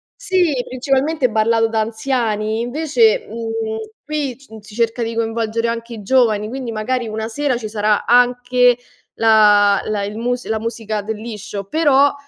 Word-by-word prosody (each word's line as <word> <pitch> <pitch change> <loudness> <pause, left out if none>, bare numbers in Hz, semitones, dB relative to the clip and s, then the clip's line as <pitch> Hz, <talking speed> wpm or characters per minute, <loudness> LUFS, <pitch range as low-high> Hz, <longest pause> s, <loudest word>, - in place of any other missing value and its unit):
sìc, 355 - 0
principalmente 270 +2 0
ballato 225 +1 +2
da 220 - -1
anziani 220 -2 -1
invece, 320 - +2
mhmm, 225 -1 -4 0.3
qui, 290 -4 -3
mhmm, 220 0 -10
s 205 - -19
si 210 - -12
cerca 230 +1 0
di 230 0 -4
coinvolgere 230 0 -1
anche 230 0 -5
i 220 - -8
giovani, 215 -2 +2
quindi 255 -2 -5
magari 235 +2 -2
una 220 +1 -4
sera 275 +2 -1
ci 215 -3 -6
sarà 210 -1 +1
anche 245 0 +4 0.4
la 210 -2 +5
la 210 -2 -2
il 205 +2 -5
mus 245 +2 -2
la 220 0 -1
musica 220 -2 -3
del 220 +1 -4
liscio, 210 -3 -6
però, 285 +2 +3
230 Hz, 160 wpm, -19 LUFS, 220-255 Hz, 0.4 s, la